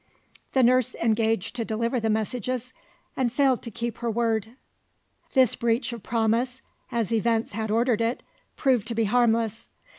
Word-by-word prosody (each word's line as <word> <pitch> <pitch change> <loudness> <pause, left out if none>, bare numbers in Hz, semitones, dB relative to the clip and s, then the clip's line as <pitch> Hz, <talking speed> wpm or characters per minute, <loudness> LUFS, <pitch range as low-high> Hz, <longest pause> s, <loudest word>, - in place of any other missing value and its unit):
The 265 - +4
nurse 255 0 +3
engaged 225 -2 0
to 230 - 0
deliver 230 +3 -1
the 225 -1 -1
messages 245 +3 -2 0.4
and 250 -3 0
failed 265 -1 +2
to - - -6
keep 235 0 -4
her 235 - -2
word. 225 -1 0 0.8
This 260 -4 +4
breach 235 +1 0
of 235 - -7
promise 235 +4 0 0.3
(as 230 -2 -1
events 225 0 +1
had 220 +1 -3
ordered 230 +1 +2
it) 230 +2 -1 0.3
proved 255 -7 +1
to 230 - -3
be 225 - +2
harmless. 225 0 +1
230 Hz, 155 wpm, -26 LUFS, 225-245 Hz, 0.8 s, The